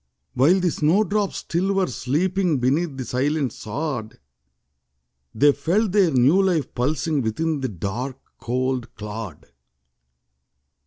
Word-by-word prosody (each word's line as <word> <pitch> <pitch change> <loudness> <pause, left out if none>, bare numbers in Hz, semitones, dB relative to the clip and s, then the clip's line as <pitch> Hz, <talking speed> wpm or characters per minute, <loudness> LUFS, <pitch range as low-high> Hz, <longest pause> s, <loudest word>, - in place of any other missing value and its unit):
While 150 +10 +4
the 180 -2 +1
snow 165 +9 +2
drops 205 0 -1
still 185 +4 -1
were 195 -1 +2
sleeping 170 +5 0
Beneath 140 +4 0
the 130 - -4
silent 135 0 0
sod; 120 -2 -5 1.2
They 145 +1 +5
felt 180 +9 0
their 195 -3 +4
new 140 +7 +4
life 180 -6 0
pulsing 150 +3 0
Within 150 +7 -1
the 130 -1 -2
dark, 110 +8 -4 0.2
cold 125 0 -2
clod. 105 -5 -7
145 Hz, 120 wpm, -23 LUFS, 125-175 Hz, 1.2 s, They